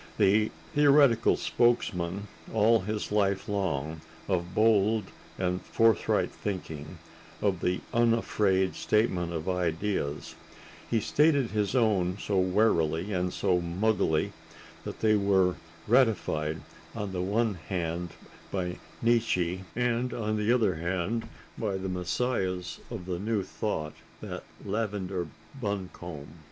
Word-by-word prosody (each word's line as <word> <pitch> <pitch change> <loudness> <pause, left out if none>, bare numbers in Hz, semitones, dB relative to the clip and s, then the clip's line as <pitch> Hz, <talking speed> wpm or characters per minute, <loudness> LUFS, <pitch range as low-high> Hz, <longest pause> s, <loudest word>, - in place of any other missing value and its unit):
The 105 +3 +4 0.2
theoretical 140 -5 +5
spokesman, 100 -5 +1 0.2
all 110 +1 +4
his 105 +2 -3
life 100 -2 +1
long, 80 -6 -2 0.3
of 90 -1 -1
bold 110 0 +4 0.3
and 90 0 -1
forthright 115 -4 +2
thinking, 80 -5 -5 0.4
of 100 -4 +1
the 90 +1 0
unafraid 105 -5 +2
statement 95 -6 +1
of 80 0 -4
ideas, 90 -3 -1 0.6
he 115 - +2
stated 145 -1 +3
his 105 +2 0
own 100 -7 +2
so 100 -2 0
warily 90 -2 +2
and 90 -1 0
so 90 -2 +1
muggily 85 -2 +1 0.5
that - - -6
they 110 -1 +4
were 95 -3 +3 0.3
ratified 85 - +2 0.3
on 105 -3 -3
the 90 -1 -2
one 105 +4 +1 0.2
hand 85 -1 -2 0.4
by 90 -2 -2 0.2
Nietzsche 95 -6 +1
and 125 +1 0
on 110 -2 -1
the 105 +1 +1
other 110 -6 +3
hand 90 +7 -2 0.3
by 100 -4 -1
the 95 0 -4
messiahs 90 0 -1
of 110 -7 -6
the 90 -1 -3
New 105 0 0
Thought, 80 -7 -3 0.3
that - - -6 0.2
lavender 100 -4 -2 0.3
buncombe. 90 - -5
95 Hz, 120 wpm, -29 LUFS, 90-110 Hz, 0.6 s, theoretical